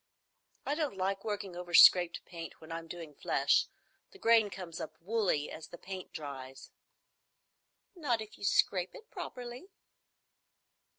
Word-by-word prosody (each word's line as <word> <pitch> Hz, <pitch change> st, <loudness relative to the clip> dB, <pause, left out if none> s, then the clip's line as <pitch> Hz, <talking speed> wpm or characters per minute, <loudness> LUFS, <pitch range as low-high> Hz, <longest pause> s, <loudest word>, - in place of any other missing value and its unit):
"I -, -, 0 dB
don't 300 Hz, -9 st, -2 dB
like 195 Hz, +1 st, -1 dB
working 205 Hz, -4 st, -4 dB
over 175 Hz, -1 st, -3 dB
scraped 175 Hz, -1 st, +7 dB
paint 165 Hz, -2 st, -8 dB
when 160 Hz, +1 st, -12 dB
I'm 165 Hz, 0 st, -5 dB
doing 165 Hz, -3 st, -8 dB
flesh. -, -, +2 dB, 0.4 s
The 395 Hz, -, -16 dB
grain 225 Hz, -, +5 dB
comes 180 Hz, -4 st, -7 dB
up 155 Hz, -, -7 dB
woolly 190 Hz, -6 st, 0 dB
as 160 Hz, -, -8 dB
the 175 Hz, -, -10 dB
paint 190 Hz, 0 st, -7 dB
dries." 135 Hz, -3 st, -8 dB, 1.2 s
"Not 275 Hz, -10 st, 0 dB
if 215 Hz, -1 st, -8 dB
you -, -, -13 dB
scrape 185 Hz, -2 st, +2 dB, 0.2 s
properly." 245 Hz, +7 st, -7 dB
185 Hz, 135 wpm, -32 LUFS, 165-220 Hz, 1.2 s, scraped